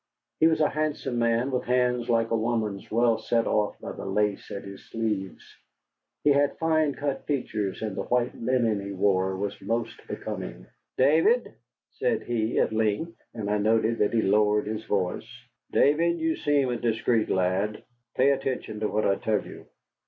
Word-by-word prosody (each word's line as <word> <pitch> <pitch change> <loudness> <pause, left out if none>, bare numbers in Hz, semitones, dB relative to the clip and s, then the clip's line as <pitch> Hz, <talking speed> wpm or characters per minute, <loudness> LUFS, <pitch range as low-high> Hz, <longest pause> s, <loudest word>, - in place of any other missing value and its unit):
He 160 - +6
was 160 -1 +2
a 150 - +4
handsome 150 -5 -2
man, 115 +3 +1
with 125 - -1
hands 125 -1 +1
like 115 -1 +2
a - - +3
woman's, 110 -3 -1
well 115 0 +2
set 115 -1 +1
off 105 -1 0
by - - -6
the - - -8
lace 100 +1 -1
at 100 - -6
his 100 0 -11
sleeves. 105 -5 -3 0.8
He 145 - +5
had 140 0 +2
fine 155 -3 +1
cut 145 -1 -3
features, 110 -9 -2
and 105 -3 -3
the - - -2
white 125 0 0
linen 115 -4 +1
he 100 0 -5
wore 95 -1 +1
was 100 +1 -4
most 115 +2 -3
becoming. - - -6 0.3
"David," 160 - +3 0.4
said - - -1
he, 115 -1 -1
at - - +2
length, 110 +10 0 0.2
and 110 -3 -4
I 105 0 +1
noted 110 +2 +2
that 105 - +2
he 115 - +2
lowered 105 +1 +3
his 110 +1 -4
voice, 100 +1 -1 0.4
"David, 170 +4 +3
you 160 -1 0
seem 145 -3 +1
a 120 - -1
discreet 115 0 +1
lad. 95 +3 0 0.3
Pay 135 +2 +4
attention 130 -5 -2
to 105 - 0
what 110 +1 0
I 100 - +2
tell 110 -2 0
you. - - -11
115 Hz, 175 wpm, -26 LUFS, 105-130 Hz, 0.8 s, He